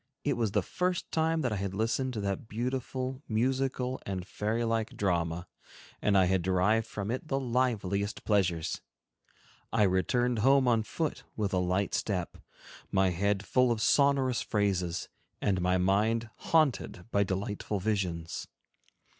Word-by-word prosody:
It - - +1
was 115 -4 -1
the - - +2
first 180 -1 -2
time 160 0 +1
that 125 - 0
I - - -1
had 100 0 -3
listened 115 +5 0
to 110 - -3
that 100 +2 -3
beautiful, 130 +3 -3
musical, 130 +2 0
and 95 -2 -4
fairy 110 +4 -1
like 115 -1 -1
drama, 85 -3 0 0.6
and 100 -1 +3
I 95 - +5
had 95 0 +2
derived 95 +5 +2
from 105 0 -4
it 130 +5 -4
the 135 -2 0
liveliest 110 -6 -1
pleasures. 90 -6 +1 0.9
I 110 -2 +3
returned 115 +6 +2
home 135 +3 +4
on 115 -2 +4
foot 155 +8 -3
with 105 -2 -1
a 95 - +3
light 90 +2 0
step, 90 -5 -2 0.5
my 95 -1 +3
head 100 +3 0
full 125 +2 +3
of 115 - 0
sonorous 130 0 +3
phrases, 95 -6 0 0.3
and 95 -3 +1
my 90 +1 +2
mind 110 +5 +1
haunted 150 - +1
by 100 - +3
delightful 100 +1 -2
visions. 90 -5 -2
105 Hz, 150 wpm, -30 LUFS, 95-125 Hz, 0.9 s, I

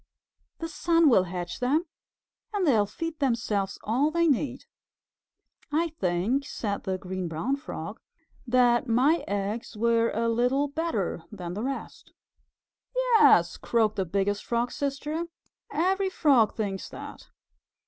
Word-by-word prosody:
The 330 - -4
sun 330 -1 +3
will 190 -5 +5
hatch 175 -1 -5
them 285 +7 +1 0.7
and 400 -3 +1
they 295 - +5
will 210 -4 +3
feed 325 +9 -5
themselves 230 -7 0
all 255 +8 +2
they 335 +1 +2
need." 270 -2 0 1.1
"I 330 +3 +1
think," 205 - 0
said 200 -3 -3
the 190 -1 -1
Green 185 -1 -4
Brown 165 - -1
Frog, 280 +2 -7 0.5
"that 245 +1 +3
my 265 +8 +3
eggs 205 +3 -3
were 230 +1 +3
a 230 +2 -1
little 250 +5 +2
better 285 - -2
than 180 -4 -6
the 205 - -4
rest." 270 +3 -6 0.8
"Yes," - - +5
croaked 220 -2 +1
the 190 -2 -1
Biggest 200 +3 -1
Frog's 240 +1 -1
Sister, 295 +4 -2 0.4
"every 380 +6 +1
Frog 270 - +3
thinks 200 -3 -3
that." - - -10
240 Hz, 135 wpm, -27 LUFS, 205-300 Hz, 1.1 s, will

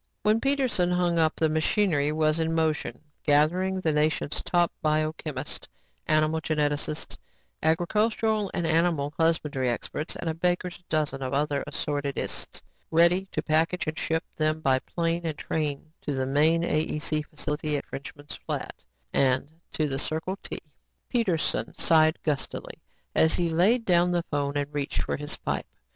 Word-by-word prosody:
When 215 +2 +3
Peterson 265 -10 +1
hung 175 -1 +2
up, 160 -1 +3
the 160 - +2
machinery 155 -1 +2
was 155 +1 +2
in 165 0 0
motion 160 -1 -1 0.2
gathering 175 +6 +3
the 165 -4 +1
nation's 150 0 0
top 175 -2 +2
biochemists, 155 -2 -1 0.4
animal 155 +1 +3
geneticists, 150 0 -1 0.4
agricultural 210 +5 +1
and 175 - -2
animal 160 -3 +1
husbandry 150 -6 +1
experts 150 +6 -3
and - - -5
a 160 - +1
baker's 175 +2 -1
dozen 150 -3 0
of 130 +1 -2
other 145 0 0
assorted 145 -2 -2
ists, - - -3 0.3
ready 170 +4 +4
to - - -2
package 165 +3 +1
and 155 +1 -3
ship 160 0 0
them 155 0 +1
by 130 -3 +3
plane 170 +3 -2
and 160 -3 -3
train 155 0 -3
to 145 - -2
the 130 0 0
main 155 +5 +3
AEC 155 -1 0
facility 150 0 -2
at - - -6
Frenchman's 145 +1 -8
Flat - - -4 0.3
and 130 0 +3 0.2
to 155 - 0
the 135 -1 0
Circle 160 +6 -1
T. - - -4 0.5
Peterson 180 -6 0
sighed 155 0 +4
gustily 145 -4 -3 0.3
as 160 - +4
he 170 -2 +1
laid 210 +9 +3
down 175 -1 +4
the 175 -1 +1
phone 145 -1 0
and 145 +1 -2
reached 145 -1 -1
for - - -2
his 145 0 -3
pipe. - - -3
155 Hz, 155 wpm, -27 LUFS, 150-175 Hz, 0.5 s, ready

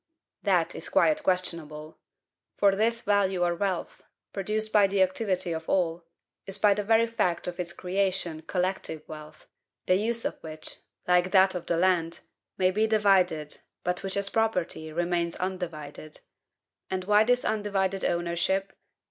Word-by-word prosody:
That - - +2
is - - -6
quite 305 -1 +3
questionable. 165 - -2 0.6
For 200 -1 +4
this 230 +3 +1
value 195 -3 +2
or 175 0 +2
wealth, 185 0 -3 0.3
PRODUCED 215 +2 -2
BY 205 -2 +6
THE 195 -1 +3
ACTIVITY 185 -2 -1
OF 160 0 -5
ALL, 170 -2 0 0.4
is 195 0 -2
by 205 0 +5
the 210 +1 -2
very 225 +2 +4
fact 220 -7 -1
of 180 0 -5
its 175 -1 -2
creation 185 -3 -1
COLLECTIVE 180 -3 -2
wealth, 155 -1 -11 0.4
the - - +3
use 230 +4 0
of - - -3
which, 155 -1 -5 0.3
like 180 0 +3
that 190 0 +5
of 180 -2 -6
the 170 - +1
land, 170 -2 +1 0.4
may 185 -1 +3
be 215 +3 +1
divided, 190 -8 +2 0.2
but 180 +1 -1
which 195 0 -3
as 200 0 -1
property 180 -8 -1
remains 170 +1 -1
UNDIVIDED. 165 -5 -5 0.7
And 185 -1 -2
why 210 +2 +5
this 245 +2 +2
undivided 195 -3 0
ownership? 175 +3 0
185 Hz, 150 wpm, -27 LUFS, 170-200 Hz, 0.7 s, BY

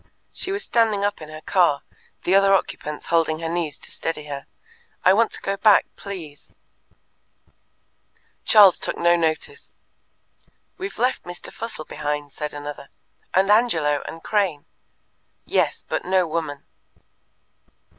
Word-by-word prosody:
She 380 - -1
was 400 +1 -2
standing 220 -4 +2
up 205 -3 -2
in 155 - -9
the 155 0 -9
car, 170 -7 +2 0.4
the 180 - +1
other 195 0 +6
occupants 150 -5 -3
holding 160 -1 +3
her 165 0 -4
knees 165 -3 -2
to - - -8
steady 165 -2 -3
her. 140 -2 -7 0.6
"I 185 - +7
want 225 +3 +3
to - - -2
go 195 0 -1
back, 210 0 +5
please." 170 -8 -9 1.9
Charles 205 -5 +7
took - - -2
no 170 0 +4
notice. 170 - -2 1.0
"We've 390 +2 -5
left 250 +2 +1
Mr. 175 0 -8
Fussell 225 -9 -5
behind," 145 -1 -4
said 150 +1 -5
another; 145 -1 -8 0.5
"and 195 +2 +4
Angelo, 160 -11 +3
and 165 - -8
Crane." 190 -9 0 0.8
"Yes, - - 0
but - - -2
no 185 0 +2
woman." 155 -3 -4
170 Hz, 135 wpm, -23 LUFS, 150-200 Hz, 1.9 s, I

